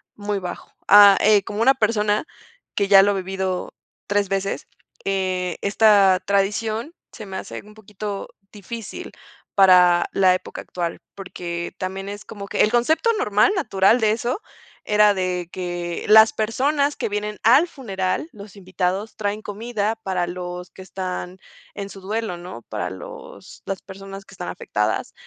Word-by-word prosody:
muy 205 -1 -3
bajo. 180 -1 -7 0.2
Ah, 205 -1 +9
eh, 210 -2 +5
como 210 +2 -4
una 265 +4 +6
persona 215 -2 +1 0.5
que 200 -1 +1
ya 195 -1 +8
lo 205 - +3
ha 200 - -1
vivido 190 -1 -3 0.3
3 205 0 +1
veces, 195 0 -2 0.4
eh, 185 -2 -1
esta 200 -2 +4
tradición 215 - -1 0.2
se 215 - -9
me 190 -1 -6
hace - - -7
un 210 +1 -16
poquito 210 -1 -6 0.2
difícil 210 +1 -8 0.4
para 180 -3 +6
la 185 -1 +4
época - - -7
actual. 170 -2 -4 0.2
Porque 175 -3 -6
también 195 +1 -4
es 205 +1 -8
como 200 -2 -8
que - - 0
el 210 - +2
concepto 315 - +2
normal 210 - +3
natural 225 - +3
de 215 - +3
eso 240 - -2 0.4
era 210 0 +4
de 180 -2 -2
que 175 -2 -4
las 220 +1 +8
personas 280 +6 0
que - - -2
vienen 210 0 -3
al 265 +10 +6
funeral, 195 - -3
los 205 -1 -12
invitados, 190 +2 -3
traen 205 0 -2
comida 215 +1 -2
para 185 -2 -1
los 180 0 -6
que 190 - -13
están 185 -1 -5 0.4
en 200 -1 -5
su 195 -1 -11
duelo, 210 -2 -3
¿no?, 175 -9 -9
para 105 -5 -4
los 95 -1 -11
las 195 -2 -4
personas 195 +1 -10
que - - -16
están 180 - -6
afectadas 105 +1 -2
200 Hz, 155 wpm, -22 LUFS, 185-215 Hz, 0.5 s, Ah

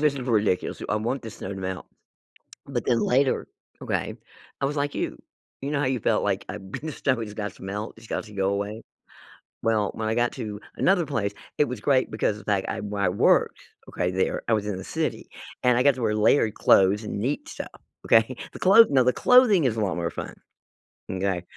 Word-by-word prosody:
this 150 -2 +3
for 135 - -4
ridiculous, 105 -4 +1
too? - - -7
"I - - +1
want 115 +5 -2
this 110 -2 -8
snow - - -6
to - - -7
melt." 95 -1 -5 0.8
But - - -3
then 120 -2 +3
later, 130 +2 +2 0.4
okay, - - -2 0.5
I 135 - +2
was 145 - -2
like 145 0 -1
you. - - -3 0.4
You 140 - -3
know 145 -1 0
how 145 - +1
you 130 -2 0
felt - - +1
like, - - 0
"I've 95 -1 -8
been - - -5
to - - -3
snow. 130 -3 0
It's 105 -2 -6
got 105 -1 -4
to - - -18
melt. 105 +3 -5
It's 115 0 -14
got - - -3
to 105 -2 -13
go 95 -1 0
away." 100 +3 -3 0.8
Well, 110 -2 +1
when 110 -1 -3
I 110 - 0
got 120 0 +2
to 105 -2 -6 0.2
another 180 -4 +2
place, 110 -8 -1 0.3
it 150 - +4
was 125 -3 -4
great 130 0 +2
because 110 -1 0
of - - -13
the 105 - 0
fact 95 -1 0
I - - -3
where 100 -1 -3
I 95 - +3
worked, 90 - +2 0.3
okay, 90 0 -1
there, 95 +1 -1
I 115 - +2
was 105 -2 +1
in 100 -3 -3
the - - -7
city, - - -3 0.3
and 125 -1 +4
I 125 - +2
got 140 - +5
to 125 - -6
wear 105 -1 +1
layered 110 0 +3
clothes 100 +3 +4
and 105 - -4
neat 135 +7 -2
stuff. - - -8 0.3
Okay? 115 +3 +4 0.2
The - - -9
clothes 215 +4 +7
no, 130 -2 +4
the 125 - +3
clothing 250 -9 +5
is 120 -4 +1
a 110 - -1
lot 100 -3 0
more 85 -1 -2
fun. - - -7 0.8
M'kay? 95 -1 -1
110 Hz, 235 wpm, -25 LUFS, 100-130 Hz, 0.8 s, clothes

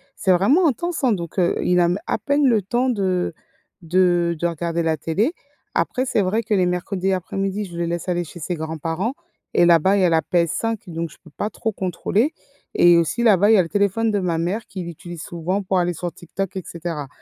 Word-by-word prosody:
C'est 190 - +1
vraiment 260 - +4
intense 320 +4 -2
hein! 255 - +4
Donc 175 -2 -3
heu, 175 - +2
il 180 0 +3
a - - +4
m 175 +3 0
à - - 0
peine 285 +7 +1
le 225 -4 +3
temps 240 +7 0
de 185 -6 0 0.5
de 175 0 +2
de 175 - +1
regarder 170 0 -2
la 160 -1 +1
télé. 200 - 0 0.4
Après 255 - 0
c'est 220 - +1
vrai 195 +4 +1
que 215 - -1
les 185 -3 +3
mercredis 180 +2 -1
après-midi 195 +2 -2
je 175 -3 -9
le 170 - -1
laisse 170 +1 -3
aller 175 -1 0
chez 175 +1 -11
ses 175 +3 -3
grands-parents 160 - -3 0.4
et 175 - +5
là-bas, 175 +3 +5
il - - +2
y - - +4
a - - +4
la 165 -1 +3
PS5 180 +7 0
donc 165 -1 -4
je - - -16
peux 165 - -15
pas 210 - -3
trop 220 - -2
contrôler 200 - 0 0.4
et 175 -1 +6
aussi 170 +8 0
là-bas 205 -2 +5
il 220 - +7
y - - +6
le 165 - -4
téléphone 205 +3 +1
de 205 - +1
ma 175 -3 -1
mère 190 +7 -2
qui 185 -2 -6
l'utilise 170 0 -8
souvent 175 +4 -2
pour 190 0 0
aller 175 0 0
sur 175 +1 -4
TikTok 190 +3 -5
et 190 - -4
cetera, 165 -4 -5
180 Hz, 225 wpm, -22 LUFS, 170-205 Hz, 0.5 s, il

